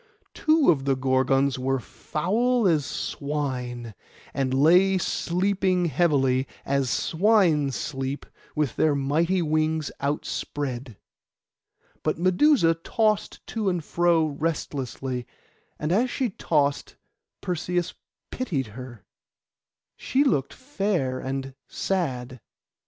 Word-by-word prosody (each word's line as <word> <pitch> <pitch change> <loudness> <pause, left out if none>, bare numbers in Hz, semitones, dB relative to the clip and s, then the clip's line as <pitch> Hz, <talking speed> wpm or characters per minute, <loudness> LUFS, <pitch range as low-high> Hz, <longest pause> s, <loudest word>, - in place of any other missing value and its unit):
Two 310 - +4
of 140 -4 -1
the 135 -1 +2
Gorgons 130 +1 +2
were 135 +1 0
foul 220 - 0
as 155 -5 +2
swine, 125 -5 -4 0.4
and 135 -2 -1
lay 180 +8 +5
sleeping 185 +1 0
heavily, 135 -5 +2 0.2
as 140 -2 0
swine 170 - +3
sleep, 135 +1 -4 0.3
with 150 -6 -1
their 155 -2 +3
mighty 165 +6 +1
wings 155 -1 0
outspread; 135 -4 -3 1.0
but 155 - -1
Medusa 185 - +4
tossed 215 +5 -1
to 215 -3 -1
and 175 -3 -1
fro 170 0 +2
restlessly, 140 -5 -3 0.5
and 150 +2 -2
as 235 +7 +2
she 245 -3 -1
tossed 145 -6 0 0.5
Perseus 180 0 -2 0.4
pitied 145 - -2
her, 125 -4 -10 0.9
she 270 +2 +1
looked 140 - +1
so - - -17
fair 195 - -1
and 135 0 -4
sad. 130 - -2
150 Hz, 105 wpm, -25 LUFS, 135-180 Hz, 1.0 s, lay